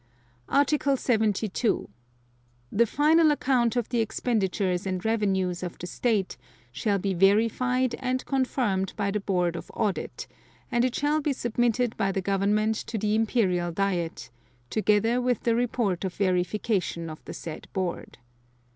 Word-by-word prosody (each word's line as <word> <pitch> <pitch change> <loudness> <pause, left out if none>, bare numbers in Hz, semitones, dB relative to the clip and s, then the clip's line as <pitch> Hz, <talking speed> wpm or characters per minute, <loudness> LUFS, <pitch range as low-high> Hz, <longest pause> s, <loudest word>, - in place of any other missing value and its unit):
Article 280 0 +2
72. 220 -2 0 0.8
The 235 +3 +4
final 310 +6 +4
account 250 -5 +2
of 240 -3 -1
the 240 - 0
expenditures 200 -5 0
and 185 0 -3
revenues 190 -5 0
of 180 -2 -5
the - - -7
State 205 +1 -1 0.3
shall 200 - 0
be 195 0 -1
verified 230 +7 +2
and 255 0 -2
confirmed 245 -8 0
by 200 -1 0
the 210 - -1
Board 180 -4 0
of - - -7
Audit, 210 -5 -2 0.5
and 240 0 +2
it 255 -1 0
shall 295 +2 +1
be 290 -1 0
submitted 240 -1 0
by 195 - +1
the 195 - -1
Government 200 +3 +1
to 230 - -4
the 210 0 0
Imperial 200 -6 +1
Diet, 170 -9 -2 0.4
together 220 +3 +2
with 245 -3 0
the 230 - +2
report 230 -6 0
of 190 -2 -3
verification 185 -1 0
of 155 -1 -9
the - - -7
said 160 -2 -7
board. 185 -3 -4
215 Hz, 145 wpm, -26 LUFS, 190-245 Hz, 0.8 s, The